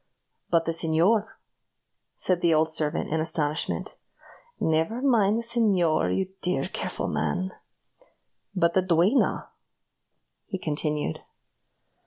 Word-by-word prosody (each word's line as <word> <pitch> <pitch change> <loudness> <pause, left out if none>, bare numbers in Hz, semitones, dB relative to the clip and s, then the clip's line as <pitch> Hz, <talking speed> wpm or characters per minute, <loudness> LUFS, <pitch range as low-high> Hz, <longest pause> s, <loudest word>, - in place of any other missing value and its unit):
"But 165 -1 +2
the 165 - 0
señor?" 170 +7 +2 0.9
said 180 -2 +1
the 165 -2 +3
old 160 +1 +2
servant, 155 0 -1
in 160 - +1
astonishment. 155 -1 -1 0.7
"Never 160 +9 0
mind 225 -6 +3
the 235 - -3
señor, 200 -9 +2
you 190 -1 -1
dear, 155 -7 0
careful - - -4
man." 80 +5 -1 1.0
"But 170 -2 +2
the 190 - +3
duenna?" 185 - +2 1.0
he 190 - -4
continued. 150 - -1
170 Hz, 110 wpm, -26 LUFS, 155-195 Hz, 1.0 s, the